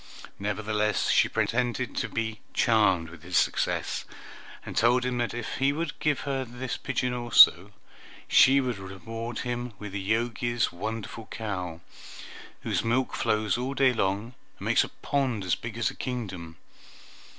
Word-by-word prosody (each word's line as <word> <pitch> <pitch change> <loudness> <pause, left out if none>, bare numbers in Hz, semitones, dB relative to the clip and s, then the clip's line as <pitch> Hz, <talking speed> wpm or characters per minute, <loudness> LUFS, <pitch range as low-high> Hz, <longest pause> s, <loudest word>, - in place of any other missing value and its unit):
Nevertheless 105 +1 0
she - - +4
pretended 125 0 -1
to - - -1
be 110 -1 -3 0.2
charmed 95 -8 +3
with 85 -2 -12
his - - -1
success, - - 0 0.6
and - - -7
told 125 +2 +3
him 125 -1 -1
that 120 -1 -1
if 120 -2 -4
he 135 +1 +3
would 165 +4 -4
give 150 -4 +1
her 135 -2 -2
this 125 +1 -5
pigeon 125 -2 -2
also, 110 -6 +6 0.6
she 135 +1 +6
would 125 -6 -2
reward 115 +5 -6
him 120 -1 -3
with 105 -1 -7
the 100 0 -4
Jogi's 120 0 0
wonderful 110 +4 -5
cow, 90 -6 -5 0.8
whose - - -1
milk 120 +3 +1
flows 110 +1 +1
all 130 +2 -3
day 135 -2 +4
long, 105 +3 -1 0.2
and - - -8
makes - - +4
a - - -6
pond 130 -7 -1
as 90 - +1
big 115 -1 -4
as 115 - +1
a - - -14
kingdom. 95 - -5
115 Hz, 155 wpm, -27 LUFS, 105-125 Hz, 0.8 s, also